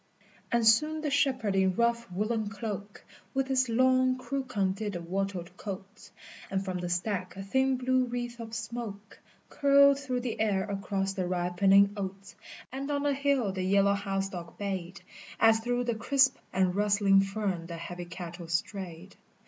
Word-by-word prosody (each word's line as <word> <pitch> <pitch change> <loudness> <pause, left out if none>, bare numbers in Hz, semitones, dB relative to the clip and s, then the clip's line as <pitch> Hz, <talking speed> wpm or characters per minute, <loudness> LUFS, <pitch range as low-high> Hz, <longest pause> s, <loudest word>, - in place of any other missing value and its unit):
And 235 -2 +2
soon 305 +8 +4
the 300 -2 -2
shepherd 260 -8 +1
in 190 -1 +2
rough 235 -3 +1
woollen 215 +3 -1
cloak 205 -2 -6 0.3
With 270 0 0
his 260 -2 +2
long 255 +2 +3
crook 260 0 -4
undid 200 +1 0
the 175 - -3
wattled 185 0 -3
cotes, 200 +1 -8 0.4
And 195 0 -1
from 185 -1 -3
the 175 0 -4
stack 185 +1 -2
a 195 - -6
thin 265 +6 +1
blue 255 0 +2
wreath 240 0 -4
of 225 -1 -6
smoke 220 -4 -6 0.3
Curled 280 0 +5
through 255 -3 -2
the 245 -2 -4
air 200 -3 +2
across 195 -1 -2
the 185 -2 -2
ripening 190 +3 +3
oats, 195 -1 -6 0.4
And 270 +2 -4
on 285 -1 0
the 290 -1 +2
hill 275 -6 +1
the 190 0 -4
yellow 200 +1 +3
house 195 -1 -1
dog 175 -3 -8
bayed 190 -2 -4 0.4
As 225 0 +5
through 245 +2 -1
the 240 -1 0
crisp 265 +4 +3 0.2
and 185 -1 +2
rustling 200 -1 +4
fern 195 -4 -2
the 170 -1 -6
heavy 175 +1 -6
cattle 175 0 -8
strayed. 175 +1 -4
205 Hz, 165 wpm, -29 LUFS, 190-245 Hz, 0.4 s, Curled